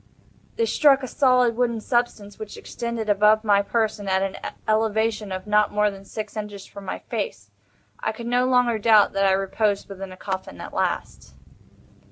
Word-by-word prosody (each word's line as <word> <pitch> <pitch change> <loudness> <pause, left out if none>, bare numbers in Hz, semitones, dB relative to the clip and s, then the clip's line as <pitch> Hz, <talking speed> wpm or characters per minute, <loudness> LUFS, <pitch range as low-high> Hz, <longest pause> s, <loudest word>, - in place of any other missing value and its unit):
They 460 - +1
struck 280 -9 +4
a - - -3
solid 250 -3 +3
wooden 235 -1 0
substance, 220 -4 -2
which 215 -1 -8
extended 235 -2 -5
above 210 +1 +4
my 205 -2 +4
person 210 -1 -1
at 190 0 +2
an 195 0 -3 0.3
elevation 220 -1 0
of 185 0 -5
not 210 0 +3
more 210 0 +2
than 195 0 -12
six 215 0 -7
inches 210 -2 -6
from 200 -1 -11
my - - -4
face. 485 - -5 0.5
I - - -1
could 230 +2 -9
no 245 +1 +2
longer 250 -3 +3
doubt 215 -1 +5
that 195 0 +2
I - - +4
reposed 200 +1 0
within 195 -1 -7
a 185 - -11
coffin 190 0 -5
at - - -8
last. - - -3
215 Hz, 180 wpm, -24 LUFS, 200-235 Hz, 0.5 s, doubt